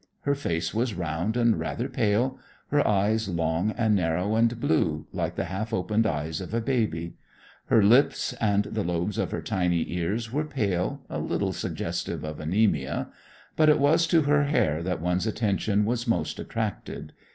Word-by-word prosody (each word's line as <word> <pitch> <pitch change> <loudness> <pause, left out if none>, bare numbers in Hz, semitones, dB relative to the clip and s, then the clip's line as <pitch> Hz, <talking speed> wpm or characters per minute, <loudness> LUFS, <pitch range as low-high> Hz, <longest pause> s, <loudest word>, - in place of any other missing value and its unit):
Her 140 - +1
face 85 -12 -2
was 115 -1 0
round 85 +6 -2
and 115 -2 +3
rather 120 +2 -2
pale; 120 0 0 0.3
her 145 0 +3
eyes 105 +1 +1
long 85 +2 0
and 110 -3 +2
narrow 90 +2 +1
and 115 +1 +2
blue, 80 -8 +1
like - - -2
the - - -1
half 110 +4 -4
opened 110 +3 +1
eyes 75 -1 -2
of 95 +4 -5
a - - +2
baby; 110 -9 -1 0.5
her 110 - +4
lips 125 +4 +4
and 105 -2 +3
the 105 0 -3
lobes 90 +3 -2
of - - 0
her - - -4
tiny 90 -3 0
ears 105 +7 -2
were 150 +2 0
pale, 100 -12 -1
a - - -4
little - - -1
suggestive - - -3
of 75 0 -6
anaemia. 80 -4 0 0.5
But 155 -1 +5
it 150 - +6
was 155 +4 +3
to 165 -1 +4
her 145 0 +3
hair 80 - +1
that 90 -2 -2
one's 90 +4 0
attention 105 -1 +1
was 120 +2 -1
most 115 - 0
attracted. 110 -3 -4
105 Hz, 175 wpm, -26 LUFS, 90-120 Hz, 0.5 s, it